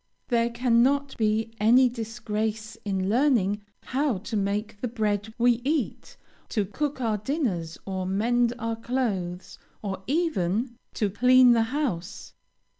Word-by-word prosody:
There 235 -1 +2
cannot 250 +4 +2
be 220 0 +1
any 240 +5 +6
disgrace 220 -2 -3
in 190 -2 -1
learning 215 -4 +2 0.2
how 265 -4 0
to 220 +4 -6
make 205 +1 -2
the 250 - -1
bread 215 -2 -1
we 240 0 +3
eat, 295 +1 -2 0.3
to 210 -4 0
cook 290 +8 -3
our 220 -4 0
dinners, 205 - -2
to 190 -1 -3
mend 235 +5 +2
our 230 0 -2
clothes, 205 -8 -3 0.2
or 190 -2 -4
even 245 - 0 0.2
to 210 -3 0
clean 250 +4 +6
the 230 -1 +4
house. 255 - -3
225 Hz, 130 wpm, -26 LUFS, 205-250 Hz, 0.3 s, any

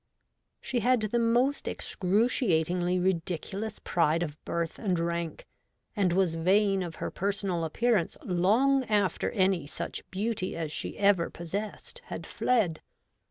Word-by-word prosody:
She 250 - -2
had 250 +2 +3
the 215 +3 0
most 240 +5 +2
excruciatingly 180 -4 +1
ridiculous 190 +4 -2
pride 165 0 +1
of 155 -2 -7
birth 170 -1 -2
and 190 -6 0
rank, 170 -1 -3 0.5
and 195 -4 +2
was 180 -2 +2
vain 195 +4 +3
of 170 -2 -5
her - - -4
personal 195 -3 -1
appearance 205 +3 +1
long 225 +10 +3
after 205 -5 +1
any 185 -7 +1
such 145 - -4
beauty 200 -1 -2
as 160 -2 -3
she - - -4
ever 200 -4 +3
possessed 205 - -6
had - - -6
fled. 205 -11 +1
190 Hz, 130 wpm, -29 LUFS, 170-215 Hz, 0.5 s, had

